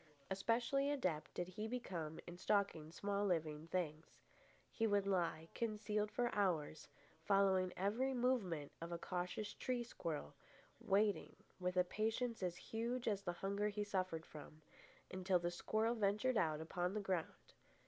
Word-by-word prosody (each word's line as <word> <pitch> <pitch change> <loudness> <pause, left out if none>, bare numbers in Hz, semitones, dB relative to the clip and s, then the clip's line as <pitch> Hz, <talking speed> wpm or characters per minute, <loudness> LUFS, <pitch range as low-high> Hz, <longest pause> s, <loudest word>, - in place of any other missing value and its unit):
Especially 235 +8 +2
adept 185 - 0
did 175 - -1
he 210 +4 -4
become 175 -10 -3
in 175 - -7
stalking 180 -5 +1
small 200 +3 -1
living 160 -5 0
things. 165 -3 -1 0.6
He 225 - +1
would 205 -2 +3
lie 170 -4 +1
concealed 210 -2 0
for 245 -1 +1
hours, 165 -7 +1 0.4
following 190 -2 +4
every 235 +8 +1
movement 210 - +1
of 170 +1 -4
a 170 - -1
cautious 180 +4 -3
tree 250 -2 -1
squirrel, 160 - -4 0.5
waiting, 205 +1 +2 0.2
with 180 0 -1
a 180 - +7
patience 225 +5 -1
as 180 -2 0
huge 235 +6 -2
as 205 -3 +1
the 175 -3 -2
hunger 200 +2 +1
he 210 0 -1
suffered 185 -5 -1
from, 155 0 -11 0.5
until 185 0 +2
the 175 0 -1
squirrel 220 +6 +1
ventured 215 +3 +2
out 160 -7 +2
upon 175 +4 -1
the - - +1
ground. 185 -4 -3
195 Hz, 150 wpm, -41 LUFS, 175-215 Hz, 0.6 s, a